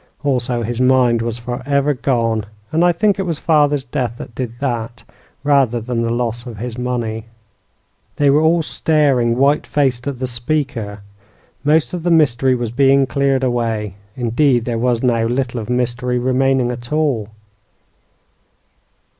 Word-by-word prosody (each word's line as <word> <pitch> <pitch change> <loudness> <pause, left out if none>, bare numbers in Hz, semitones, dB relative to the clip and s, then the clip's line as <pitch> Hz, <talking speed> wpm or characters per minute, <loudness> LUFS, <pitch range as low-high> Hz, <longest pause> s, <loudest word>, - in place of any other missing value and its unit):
Also, 125 -3 0
his 120 +2 -3
mind 125 -2 +3
was 115 0 -3
forever 135 +4 -1
gone; 115 -5 0 0.3
and 160 +2 +2
I 175 - +5
think 200 +3 +1
it - - +2
was 170 -5 -2
father's 145 -3 +2
death 120 -2 -3
that - - -9
did 125 -1 -4
that, 120 -3 -3 0.4
rather 135 -5 +3
than 115 +1 -2
the 115 - -1
loss 120 0 -2
of 115 -3 -8
his 120 +2 -5
money." 120 -3 -3 0.9
They 145 -1 +3
were 150 +2 +4
all 165 +1 +3
staring, 140 -7 +1
white 140 +3 +2
faced, 135 -4 0
at 140 -3 -3
the 130 - -3
speaker. 120 -5 -3 0.6
Most 150 +3 +2
of 175 - -3
the 175 - -1
mystery 135 -6 +3
was 120 -2 -3
being 135 +2 +4
cleared 135 +1 0
away; 115 -5 -1 0.2
indeed, 120 0 +1
there 115 -2 -2
was 120 0 0
now 115 -3 +2
little 125 0 -1
of 110 - -7
mystery 125 0 -1
remaining 130 0 +1
at 120 0 -8
all. 140 -9 0
125 Hz, 155 wpm, -18 LUFS, 120-140 Hz, 0.9 s, I